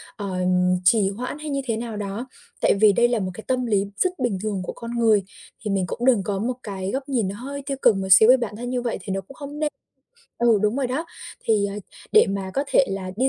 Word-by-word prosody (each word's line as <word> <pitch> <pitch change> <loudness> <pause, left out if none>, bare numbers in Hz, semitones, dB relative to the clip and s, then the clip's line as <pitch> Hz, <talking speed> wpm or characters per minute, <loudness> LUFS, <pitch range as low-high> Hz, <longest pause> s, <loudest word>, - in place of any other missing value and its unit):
ờ, 195 -3 -4 0.5
trì 195 0 +4
hoãn 250 +8 -5
hay 305 -1 -6
như 275 -1 -1
thế 225 -3 -1
nào 230 -2 -5
đó. 205 +5 -4 0.3
Tại - - +4
vì 210 -2 +7
đây 240 +3 +4
là 240 -1 0
một 185 -2 -3
cái 220 - -9
tâm 255 -1 0
lý 205 -3 +1
rất 365 -2 0
bình 240 -7 0
thường 205 -3 -2
của - - -5
con 235 0 -8
người. 215 -4 +4 0.4
Thì 205 - -1
mình 195 -2 +1
cũng 240 - -3
đừng 235 -7 +4
có 195 0 -2
một 245 +3 -1
cái 195 -2 -4
góc 270 +1 -4
nhìn 235 -7 +1
nó 195 - -4
hơi 280 +5 -6
tiêu 275 -2 -3
cực 210 - +5
một 190 0 -3
xíu 220 +5 +8
về 260 - +8
bản 230 -4 -4
thân 245 +2 -5
như 250 -1 -1
vậy 240 - -2
thì 195 - -4
nó 195 - -2
cũng 230 +9 -15
không 290 +2 -8
nên. 305 - +1 0.7
Ừ, 230 -3 +4
đúng 210 +3 +1
rồi 275 -2 0
đó. 265 +6 -2 0.4
Thì, 210 -2 +2
à, 200 - -5 0.4
để 435 - +7
mà 195 -1 -3
có 275 - 0
thể 275 - +4
là 190 -1 -4
đi 260 +4 +2
225 Hz, 265 wpm, -23 LUFS, 200-255 Hz, 0.7 s, xíu